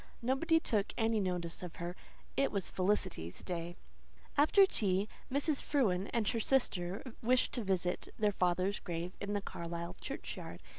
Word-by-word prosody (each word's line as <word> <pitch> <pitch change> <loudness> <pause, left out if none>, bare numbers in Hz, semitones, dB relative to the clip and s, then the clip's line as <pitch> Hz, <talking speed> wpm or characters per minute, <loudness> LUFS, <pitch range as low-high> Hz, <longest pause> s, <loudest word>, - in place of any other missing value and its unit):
Nobody 295 +7 +3
took 215 -9 0
any 225 -1 +2
notice 180 -3 -2
of 180 -2 -6
her. 175 +1 -4 0.4
It 275 - +2
was 195 -3 -1
Felicity's 185 - -1
day. 175 -1 -3 0.6
After 310 +7 +7
tea 200 - +2 0.2
Mrs. 285 +2 +1
Frewen 200 -10 +2
and 225 -3 +1
her 230 - 0
sister 200 -7 +1 0.2
wished 250 +2 +3
to 240 - -1
visit 180 -2 0
their 210 -1 +3
father's 185 +1 +1
grave 175 +1 -4
in 200 +1 -2
the 205 -1 -1
Carlisle 170 +1 -5
churchyard. 275 - -6
195 Hz, 150 wpm, -34 LUFS, 180-235 Hz, 0.6 s, After